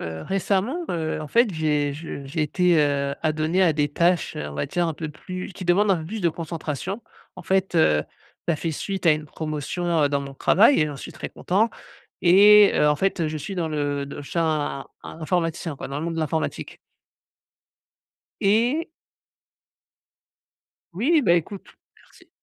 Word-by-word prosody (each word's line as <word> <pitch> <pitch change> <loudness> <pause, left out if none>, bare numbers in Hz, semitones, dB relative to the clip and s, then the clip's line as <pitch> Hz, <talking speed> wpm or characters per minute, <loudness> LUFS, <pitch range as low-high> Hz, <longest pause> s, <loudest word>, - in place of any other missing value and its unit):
heu, 80 -1 -6
récemment, 200 - -1
heu, 160 -2 -2
en 155 - -6
fait, 230 +1 +3
j'ai 150 -3 0
je 145 -1 -7
j'ai 150 +3 -2
été, 175 +3 +2
heu, 140 -2 +1
adonné 155 +3 0
à 170 -3 +4
des 145 -1 0
tâches, 170 +3 +1
on 75 -1 -5
va 75 - -2
dire 175 -1 0
un 165 - -2
peu 155 +1 -5
plus 185 +5 -7
qui 185 0 -8
demandent 195 +4 +3
un 190 - +4
peu 160 - -6
plus 215 +5 -5
de 175 - +3
concentration. 165 - -5 0.3
En - - -10
fait, 190 -1 0
heu, 75 - +3 0.4
ça 170 - +2
fait 165 +2 -3
suite 190 +4 -4
à 165 - +7
une 155 0 -3
promotion, 155 +2 -2
heu, - - +2
dans 140 0 0
mon 140 0 -7
travail 220 - +4
et 155 - +3
j'en 145 -2 -6
suis - - -8
très - - -6
content 210 +6 0 0.5
et 205 +3 +7
heu, - - +3
en 150 - +4
fait, 190 +3 0
heu, 160 - +1
je 155 - -4
suis 195 +6 -6
dans 170 -2 -1
le 145 -2 -2
de 145 - -8
chin 155 -3 -1 0.2
in 160 - -10
informaticien 165 -1 -1
quoi, - - -7
dans 140 - -4
le 155 - -4
monde 170 0 -3
de 165 - -2
l'informatique 160 +1 -3 1.6
et 235 +11 +2 2.0
Oui, 280 - +2
beh 170 -5 +4
écoute, 190 +4 -8 0.3
merci - - -22
165 Hz, 185 wpm, -24 LUFS, 150-190 Hz, 2.0 s, à